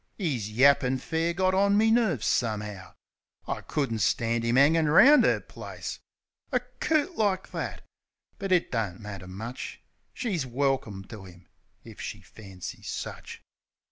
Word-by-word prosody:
'Is 135 Hz, -, -2 dB
yappin' 130 Hz, +2 st, +4 dB
fair 165 Hz, +5 st, -1 dB
got 185 Hz, +2 st, +1 dB
on 200 Hz, +1 st, +3 dB
me 220 Hz, +1 st, +4 dB
nerves, 215 Hz, -, +2 dB
some'ow. 105 Hz, -4 st, -2 dB, 0.5 s
T -, -, -1 dB
couldn't 130 Hz, -7 st, -1 dB
stand 115 Hz, +4 st, +1 dB
'im 115 Hz, +2 st, +2 dB
'angin' 155 Hz, +3 st, +5 dB
round 265 Hz, -, +7 dB
'er -, -, +3 dB
place. -, -, -8 dB, 0.5 s
A 250 Hz, -, +3 dB
coot 295 Hz, +7 st, -1 dB
like 195 Hz, -4 st, 0 dB
that!... -, -, -5 dB, 0.6 s
But 195 Hz, -2 st, -3 dB
it 180 Hz, -2 st, +2 dB
don't 105 Hz, -7 st, -2 dB
matter 100 Hz, -3 st, -8 dB
much, 110 Hz, +7 st, -7 dB, 0.3 s
She's 200 Hz, -, -2 dB
welkim 130 Hz, -6 st, -1 dB
to 105 Hz, -5 st, -9 dB
'im 90 Hz, 0 st, -16 dB, 0.4 s
if -, -, -11 dB
she -, -, -5 dB
fancies 95 Hz, -4 st, -9 dB
such. -, -, -7 dB
135 Hz, 140 wpm, -27 LUFS, -, 0.6 s, round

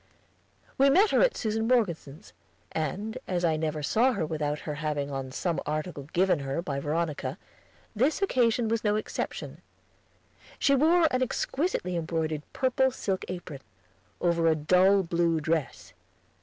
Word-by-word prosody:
We 275 Hz, +1 st, +6 dB
met 390 Hz, +10 st, +5 dB
her -, -, +4 dB
at -, -, +3 dB
Susan 220 Hz, 0 st, -1 dB
Morgeson's, 175 Hz, -, -1 dB, 0.4 s
and, 200 Hz, -, -3 dB
as 175 Hz, -2 st, 0 dB
I 160 Hz, -2 st, +2 dB
never 155 Hz, -1 st, -2 dB
saw 245 Hz, -, +3 dB
her 180 Hz, -8 st, -1 dB
without 150 Hz, -1 st, -2 dB
her 150 Hz, -, -4 dB
having 145 Hz, -2 st, -2 dB
on 135 Hz, -1 st, -4 dB
some 170 Hz, +5 st, -1 dB
article 155 Hz, -1 st, -4 dB
given 185 Hz, -2 st, +2 dB
her 135 Hz, +2 st, -3 dB
by 145 Hz, -5 st, -3 dB
Veronica, 155 Hz, +1 st, -2 dB, 0.6 s
this 265 Hz, +9 st, +2 dB
occasion 245 Hz, -, +2 dB
was 230 Hz, 0 st, -1 dB
no 210 Hz, -1 st, +2 dB
exception. 215 Hz, -, -4 dB, 1.0 s
She 280 Hz, -, +3 dB
wore 320 Hz, +5 st, +4 dB
an 255 Hz, -, 0 dB
exquisitely 255 Hz, -, -1 dB
embroidered 160 Hz, -2 st, -2 dB
purple 265 Hz, 0 st, +2 dB
silk 195 Hz, -7 st, -3 dB
apron, 175 Hz, -6 st, -6 dB, 0.6 s
over 170 Hz, -1 st, +2 dB
a 160 Hz, -, +4 dB
dull 185 Hz, +6 st, +4 dB
blue 170 Hz, -1 st, +1 dB
dress. 160 Hz, -2 st, -2 dB
175 Hz, 145 wpm, -28 LUFS, 155-230 Hz, 1.0 s, We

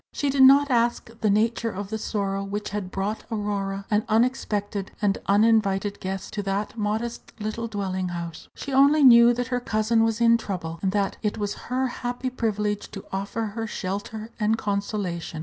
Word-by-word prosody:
She 285 Hz, -1 st, 0 dB
did 270 Hz, 0 st, +2 dB
not 275 Hz, +2 st, +7 dB
ask 235 Hz, -1 st, +1 dB
the 215 Hz, -, +2 dB
nature 230 Hz, +3 st, +1 dB
of 200 Hz, -1 st, -6 dB
the 220 Hz, -, -2 dB
sorrow 195 Hz, -2 st, -2 dB
which 205 Hz, +1 st, -4 dB
had 200 Hz, -3 st, -3 dB
brought 200 Hz, +3 st, -3 dB
Aurora 200 Hz, -3 st, -2 dB
an 210 Hz, 0 st, +3 dB
unexpected 215 Hz, -4 st, 0 dB
and 205 Hz, -2 st, +1 dB
uninvited 205 Hz, -1 st, +3 dB
guest 190 Hz, 0 st, -5 dB
to 210 Hz, -, -2 dB
that 200 Hz, +2 st, -2 dB
modest 220 Hz, +2 st, -3 dB
little 215 Hz, +2 st, -3 dB
dwelling 190 Hz, -4 st, -2 dB
house. 170 Hz, -2 st, -6 dB
She 280 Hz, -, -6 dB
only 280 Hz, +3 st, +5 dB
knew 235 Hz, -2 st, +8 dB
that 245 Hz, +1 st, -3 dB
her 250 Hz, -1 st, 0 dB
cousin 225 Hz, -1 st, +1 dB
was 225 Hz, 0 st, 0 dB
in 230 Hz, 0 st, +5 dB
trouble, 165 Hz, -6 st, -5 dB
and, 190 Hz, -, +1 dB
that 200 Hz, -1 st, 0 dB
it 210 Hz, -2 st, -1 dB
was 205 Hz, -1 st, -2 dB, 0.2 s
her 255 Hz, +1 st, +1 dB
happy 245 Hz, 0 st, -3 dB
privilege 210 Hz, -4 st, -2 dB
to 195 Hz, -, -9 dB
offer 200 Hz, +4 st, -2 dB
her 225 Hz, 0 st, -3 dB
shelter 210 Hz, +3 st, -5 dB
and 215 Hz, +1 st, +2 dB
consolation. 200 Hz, -6 st, -3 dB
210 Hz, 180 wpm, -25 LUFS, 200-230 Hz, 0.2 s, knew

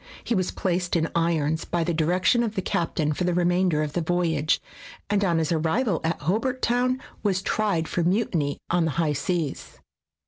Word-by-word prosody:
He -, -, -1 dB
was 185 Hz, -4 st, +1 dB
placed 180 Hz, -1 st, -1 dB
in 165 Hz, -1 st, 0 dB
irons 160 Hz, -2 st, +1 dB
by 170 Hz, -1 st, -1 dB
the 170 Hz, +1 st, -1 dB
direction 180 Hz, +8 st, +2 dB
of 220 Hz, -2 st, -2 dB
the 190 Hz, -, 0 dB
captain 160 Hz, -3 st, 0 dB
for 180 Hz, -, -2 dB
the 180 Hz, -1 st, +1 dB
remainder 175 Hz, -2 st, +2 dB
of 150 Hz, -1 st, -4 dB
the 175 Hz, -, 0 dB
voyage, 160 Hz, -2 st, +1 dB, 0.5 s
and 205 Hz, -1 st, +2 dB
on 170 Hz, -4 st, +2 dB
his 160 Hz, -1 st, 0 dB
arrival 170 Hz, +6 st, +1 dB
at 165 Hz, +1 st, -1 dB
Hobart 230 Hz, -, -1 dB
Town 250 Hz, +2 st, +2 dB, 0.2 s
was 195 Hz, -2 st, 0 dB
tried 195 Hz, -8 st, 0 dB
for 175 Hz, -, -1 dB
mutiny 170 Hz, -5 st, 0 dB
on 175 Hz, -1 st, +2 dB
the 160 Hz, -, 0 dB
high 160 Hz, -3 st, +2 dB
seas. 155 Hz, +1 st, -3 dB
175 Hz, 185 wpm, -25 LUFS, 160-190 Hz, 0.5 s, direction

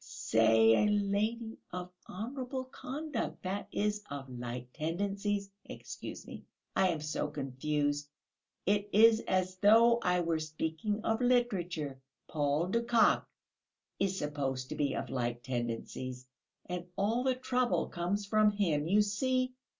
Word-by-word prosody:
I -, -, -18 dB
say 110 Hz, -, +4 dB
a -, -, +4 dB
lady 210 Hz, +3 st, 0 dB
of 180 Hz, 0 st, -5 dB, 0.2 s
honourable 255 Hz, +6 st, -4 dB
conduct, 270 Hz, +1 st, -5 dB
that 195 Hz, +2 st, -3 dB
is, 210 Hz, 0 st, 0 dB
of 140 Hz, -1 st, -6 dB
light 125 Hz, 0 st, -6 dB
tendencies 200 Hz, +5 st, -2 dB
excuse -, -, -8 dB
me, -, -, -9 dB, 0.3 s
I 190 Hz, -, +4 dB
am 165 Hz, -4 st, -1 dB
so 150 Hz, 0 st, -2 dB
confused; 145 Hz, +1 st, -2 dB, 0.6 s
it 205 Hz, +1 st, +1 dB
is 220 Hz, +1 st, +7 dB
as 185 Hz, 0 st, 0 dB
though 230 Hz, +4 st, +6 dB
I 180 Hz, -4 st, +2 dB
were 165 Hz, -2 st, 0 dB
speaking 160 Hz, +7 st, -3 dB
of 225 Hz, +2 st, 0 dB
literature 180 Hz, -, 0 dB, 0.3 s
Paul 150 Hz, +3 st, 0 dB
de 230 Hz, +4 st, +1 dB
Kock 235 Hz, -1 st, +3 dB, 0.7 s
is 190 Hz, -1 st, +1 dB
supposed 135 Hz, -4 st, -2 dB
to -, -, -4 dB
be 140 Hz, -2 st, 0 dB
of -, -, -4 dB
light 120 Hz, -2 st, -2 dB
tendencies, 125 Hz, +1 st, -4 dB, 0.4 s
and 180 Hz, 0 st, -5 dB
all 220 Hz, +5 st, +1 dB
the 260 Hz, -1 st, +2 dB
trouble 255 Hz, -1 st, 0 dB
comes 190 Hz, +4 st, -2 dB
from 215 Hz, +1 st, +4 dB
him, 170 Hz, -8 st, 0 dB
you 205 Hz, +4 st, +5 dB
see...." 255 Hz, +5 st, 0 dB
185 Hz, 140 wpm, -32 LUFS, 145-215 Hz, 0.7 s, is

